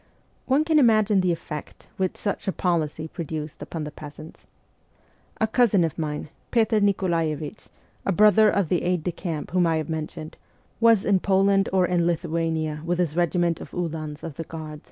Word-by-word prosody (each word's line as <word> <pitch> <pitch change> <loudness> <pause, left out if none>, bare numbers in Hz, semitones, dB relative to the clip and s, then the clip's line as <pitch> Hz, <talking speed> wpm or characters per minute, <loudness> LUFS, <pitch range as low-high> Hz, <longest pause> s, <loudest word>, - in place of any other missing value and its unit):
One 275 +3 +3
can 315 -1 +3
imagine 215 -5 +4
the 180 -1 +2
effect 150 -2 -7
which 190 -1 -1
such 200 - -3
a - - +2
policy 160 -4 -1
produced 155 -2 -6
upon 160 +1 -5
the 150 - -6
peasants. 150 +2 -11 0.9
A 220 - +3
cousin 220 -4 +3
of 160 -2 -1
mine, 150 -1 -3 0.2
Petr 225 -2 +3
Nikolaevich, 170 -4 -1 0.4
a - - 0
brother 215 +2 +6
of 200 -5 +1
the 180 - +1
aide 180 -2 0
de 180 - -1
camp 165 -3 -5
whom 180 -1 +3
I 165 -1 +2
have 155 +1 -3
mentioned, 155 0 -5 0.4
was 230 -3 +5
in 200 -2 +3
Poland 195 +1 +3
or 185 -1 +3
in 175 -1 +1
Lithuania 160 -2 -1
with 175 +1 -1
his 170 -4 0
regiment 175 -1 +1
of - - -8
uhlans 155 -4 -4
of 160 -5 -7
the 165 - -3
Guard. 155 -2 -8
170 Hz, 175 wpm, -24 LUFS, 155-195 Hz, 0.9 s, brother